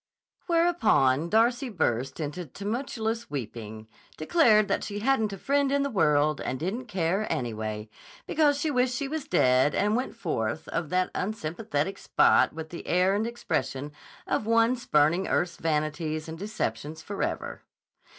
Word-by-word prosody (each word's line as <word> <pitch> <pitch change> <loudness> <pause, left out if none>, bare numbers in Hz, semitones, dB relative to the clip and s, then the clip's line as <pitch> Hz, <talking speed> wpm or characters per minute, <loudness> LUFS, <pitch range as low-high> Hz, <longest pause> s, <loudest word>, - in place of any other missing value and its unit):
Whereupon 225 - +3
Darcy 240 +5 +2
burst 135 - -1
into 155 +3 -4
tumultuous 225 - -3
weeping, 110 -4 -6 0.3
declared 215 - +4
that 195 - 0
she 205 - -5
hadn't 220 -1 +1
a 195 - -6
friend 280 +6 +1
in 280 0 +2
the 280 - -2
world, 150 - +2
and 130 - -3
didn't 225 - -3
care, 185 +3 -1
anyway, 110 -3 -3 0.4
because 295 -2 +2
she 305 +1 0
wished 250 -1 +1
she 275 +1 -2
was 305 0 -4
dead, 130 - +3
and 210 +2 +2
went 255 0 -2
forth 120 - -3
of 165 -3 -2
that 185 +1 +1
unsympathetic 195 -2 -3
spot - - +4
with 160 0 -7
the 170 - -8
air 180 +2 +3
and 215 +3 0
expression 145 - -3 0.3
of 215 - -1
one 230 +2 +4
spurning 170 -5 +2
earth's 175 -1 0
vanities 155 0 -2
and 160 0 -7
deceptions 160 - -4
forever. 200 +3 -4
185 Hz, 150 wpm, -27 LUFS, 150-235 Hz, 0.4 s, declared